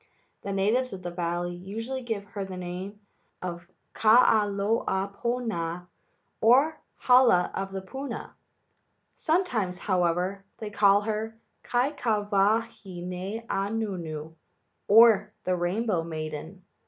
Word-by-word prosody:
The 200 - -4
natives 215 +6 +1
of 185 -1 -8
the 175 - -4
valley 175 0 -2
usually 225 +9 -5
give 225 -5 -4
her 200 -2 -3
the 190 -1 -7
name 185 +3 -6 0.4
of 175 -1 -6 0.3
Kahalaopuna, 205 -3 +1 0.6
or 260 +8 +5 0.3
The - - -21
Hala 245 -8 +5
of 195 0 -4
Puna. 270 +7 -6 0.8
Sometimes, 250 - 0
however, 180 +1 0
they 215 -2 -6
call 200 0 +5
her 220 +1 -3 0.2
Kaikawahine 210 -5 -1
Anuenue, 195 -8 -3 0.5
or 210 -1 +6
The 185 - +1
Rainbow 180 +1 0
Maiden. 160 +3 -6
200 Hz, 100 wpm, -27 LUFS, 180-225 Hz, 0.8 s, or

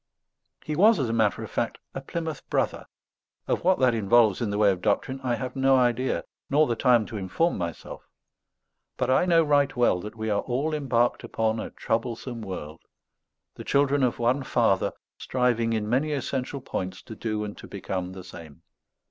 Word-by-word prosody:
He 155 - -3
was, 210 +6 +6
as 130 -6 -1
a - - -1
matter 110 -3 +1
of - - -8
fact, - - -2 0.2
a 135 - -5
Plymouth 160 +1 -4
Brother. - - -1 0.6
Of - - -1
what 185 +1 +4
that 130 -2 +3
involves 110 -1 +3
in 115 - 0
the 100 - -2
way 105 -1 +5
of 90 -2 -4
doctrine 130 +7 0
I 125 -2 0
have 125 +3 -5
no 135 0 +4
idea 125 0 +1 0.2
nor 150 +2 +4
the 120 - -1
time 120 -2 +3
to 110 - -6
inform 100 - 0
myself; 85 -3 -6 0.9
but - - 0
I 130 - +4
know 165 -2 +5
right 145 -2 +2
well 120 -7 +3
that 105 +3 -8
we 110 -1 -3
are 100 - +1
all 140 +6 -2
embarked 125 -5 +1
upon 110 0 -1
a - - -5
troublesome 115 +1 -3
world, 85 -6 -7 0.7
the - - -9
children 140 0 +2
of 125 -2 +1
one 120 +4 +1
Father, 135 - +1 0.3
striving 120 -3 +1
in 110 -2 -1
many 135 +7 +1
essential 135 0 -3
points 95 -7 -5
to 110 - -9
do 110 -1 -3
and 105 -1 -6
to - - -10
become 95 -2 -4
the 95 -1 -9
same. 85 -3 -12
120 Hz, 190 wpm, -26 LUFS, 105-135 Hz, 0.9 s, was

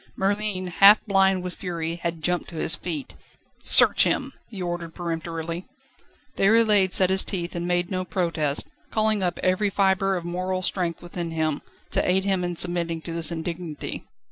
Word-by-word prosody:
Merlin, 200 -1 -1
half 195 +4 +6
blind 195 -3 +2
with 180 -1 -5
fury, 170 -2 -4
had 170 -2 -5
jumped 180 +1 -1
to 170 - -11
his 160 - +1
feet. 160 -6 -6 0.5
"Search - - +7
him!" - - -1 0.2
he 210 -4 -9
ordered 175 -2 -5
peremptorily. 165 0 -5 0.7
Déroulède 210 -2 +3
set 185 0 +3
his 190 0 +3
teeth, 175 -3 -3
and 175 0 -4
made 175 +1 -1
no 185 -1 -1
protest, 165 -6 -1 0.2
calling 215 -1 +1
up 175 -2 -2
every 185 +3 +1
fibre 195 0 +1
of 175 -2 -5
moral 185 +1 -3
strength 175 -3 -2
within 175 -1 -5
him, 155 -2 -2 0.3
to - - +1
aid 190 +1 +1
him 190 -2 0
in 175 0 -3
submitting 170 -1 +1
to 165 - -6
this 165 0 +2
indignity. 165 -1 -5
180 Hz, 170 wpm, -24 LUFS, 170-190 Hz, 0.7 s, Search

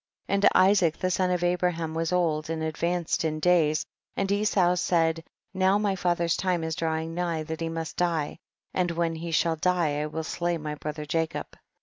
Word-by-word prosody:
And 200 +1 +4
Isaac 185 -4 +4
the 185 - -1
son 185 0 +1
of 180 -1 0
Abraham 175 -2 0
was 165 +1 -1
old 160 -4 +1
and 160 -1 -2
advanced 170 +2 -1
in 155 -1 -1
days, 155 -3 +3 0.3
and 195 0 0
Esau 200 -3 +3
said, 165 -2 +1 0.3
now 190 +1 +3
my 205 -2 0
father's 175 -2 +1
time 180 -3 0
is 160 0 -2
drawing 160 0 -2
nigh 170 -2 -1
that 160 +1 -6
he 165 - -1
must 165 0 -5
die, 165 -4 0 0.3
and 180 -1 +1
when 170 -1 0
he 165 +1 -5
shall 165 0 +1
die 160 -4 +1
I 150 - -2
will 160 +1 -4
slay 170 +1 -1
my 150 -1 -5
brother 150 0 -5
Jacob. 160 +1 -2
170 Hz, 190 wpm, -27 LUFS, 160-180 Hz, 0.3 s, And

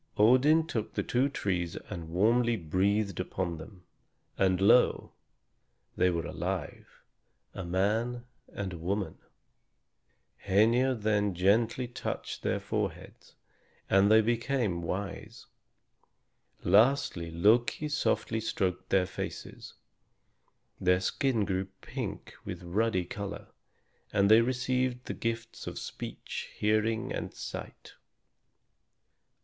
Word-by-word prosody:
Odin 130 +9 +5
took 115 -10 -4
the - - 0
two 130 +3 +1
trees 90 -9 -2 0.2
and 85 -5 -6
warmly 115 +7 +3
breathed 100 +3 0
upon 90 -2 -3
them; 90 +3 -12 0.5
and 95 -2 +2
lo! 105 +6 +4 0.8
they 90 - +3
were 85 -2 -1
alive, - - -4 0.7
a 95 - -5
man 110 +7 0 0.3
and 95 -3 -4
a 85 - -7
woman. 95 +4 -2 1.3
Hœnir 115 +6 +3
then 105 -2 +1
gently 115 +7 +2
touched 120 - -5
their - - 0
foreheads, - - -5 0.6
and 95 +1 +5
they 110 +1 +7
became 115 -4 0
wise. 95 +4 -5 1.2
Lastly 110 -6 +3
Loki 110 - +2
softly 145 -6 0
stroked 95 -4 -2
their 95 -1 +3
faces; 95 - -7 1.0
their 90 0 +3
skin 115 +2 0
grew 95 0 -1 0.2
pink - - -6
with 90 0 -6
ruddy 95 +1 0
color, 100 +2 -6 0.6
and 100 0 +3
they 110 +1 +8
received 125 0 0
the - - -4
gifts 115 0 -4
of - - -5
speech, - - -6
hearing, 110 +4 +1
and - - -5
sight. - - -8
105 Hz, 110 wpm, -30 LUFS, 95-120 Hz, 1.3 s, they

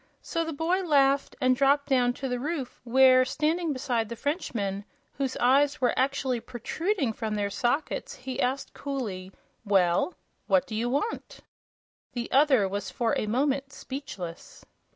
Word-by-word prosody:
So 330 - -1
the 325 - -4
boy 330 +5 0
laughed 280 -5 +2
and 255 -2 +3
dropped 280 +2 +3
down 250 -3 +3
to 270 - -5
the 250 -1 -2
roof 280 -2 -4
where, 255 +1 +6
standing 310 +5 0
beside 245 -5 -1
the 235 - -5
Frenchman, 220 - -2 0.4
whose 270 -2 -1
eyes 280 +4 +3
were 250 -2 +2
actually 265 -2 0
protruding 265 - -2
from 220 -1 -3
their 200 -1 -1
sockets, 245 +9 -1
he 260 +1 -5
asked, 260 +2 -1
coolly: 215 -10 -5 0.3
"Well, 195 - +2 0.3
what 280 -1 +3
do - - -9
you 230 +3 -1
want?" 290 - -3 0.7
The 240 -1 -4
other 265 -7 +4
was 200 +1 -4
for 230 -2 0
a 215 - -1
moment 275 +4 0
speechless. 260 - -8
260 Hz, 150 wpm, -27 LUFS, 235-285 Hz, 0.7 s, where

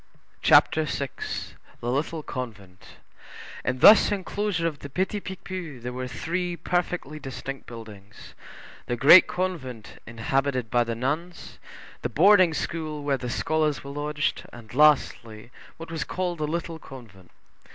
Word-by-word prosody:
CHAPTER 155 0 +5
VI—THE 135 -3 -5
LITTLE 155 +4 -2
CONVENT 100 -9 -8 0.8
In 125 - -1
this 210 - +8
enclosure 200 -2 -2
of 155 -4 -2
the 140 - -9
Petit 190 +7 -1
Picpus 185 -9 -7
there 125 0 -4
were 130 0 -4
three 175 +6 -3
perfectly 175 -2 -2
distinct 135 0 -7
buildings,—the 110 +1 -10
Great 145 +9 +8
Convent, 150 - -4
inhabited 130 0 -1
by 120 -1 +3
the 115 -1 -4
nuns, 150 +9 -4 0.4
the - - -2
Boarding 185 -1 +5
school, 155 -3 -4
where 140 -1 +1
the 125 -1 -5
scholars 155 +2 0
were 140 - -7
lodged; 150 +1 -2
and 120 -2 -13
lastly, 120 -6 +2 0.3
what 165 0 -9
was 165 -2 -2
called 180 -2 -3
the 150 - -1
Little 165 +1 -4
Convent. 110 - -13
145 Hz, 130 wpm, -25 LUFS, 125-170 Hz, 0.8 s, this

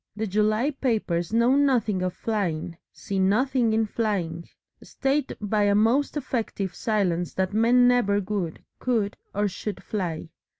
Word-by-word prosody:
The 220 +1 -2
July 215 +6 +1
papers 215 - -1
know 235 +3 +3
nothing 245 -9 +2
of 185 -1 -2
flying, 175 -7 -2 0.2
see 195 -1 -4
nothing 235 +5 +2
in 220 0 +2
flying, 190 -7 -2 0.3
state 275 +2 -1
by 210 0 +1
a 200 0 +3
most 240 +8 +2
effective 225 -8 -3
silence 180 -6 -1
that 190 +1 -1
men 240 +3 +5
never 240 -5 +3
would, 190 -4 -3 0.2
could 225 -5 0 0.2
or 205 +1 +1
should 200 +1 -5
fly. 175 -7 -4
210 Hz, 140 wpm, -25 LUFS, 190-240 Hz, 0.3 s, men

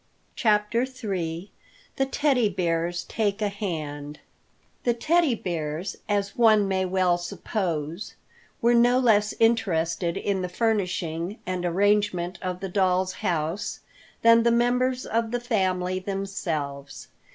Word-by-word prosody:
CHAPTER 210 +1 +2
III 195 -9 -4 0.5
THE 270 - +1
TEDDY 270 -5 +2
BEARS 175 -2 -1
TAKE 205 -2 -1
A 205 - +1
HAND 150 -7 -5 0.7
THE 240 -1 +2
Teddy 310 +1 +2
Bears, 170 -2 -4
as 200 -1 0
one 215 -4 +5
may 190 -1 0
well 180 -1 +2
suppose, 175 -2 -3 0.5
were 235 +1 +5
no 240 +1 +5
less 215 -5 +3
interested 170 -7 +1
in 195 -2 -1
the 180 - -3
furnishing 185 -3 -1
and 185 -1 -3
arrangement 185 -1 +1
of 185 0 -4
the 195 - -4
doll's 185 -1 +1
house 170 +1 -2 0.4
than 230 0 +7
the 235 - +3
members 250 +2 +1
of 230 0 0
the 245 +1 -1
family 185 -6 0
themselves. 170 -8 -4
195 Hz, 125 wpm, -25 LUFS, 175-225 Hz, 0.7 s, than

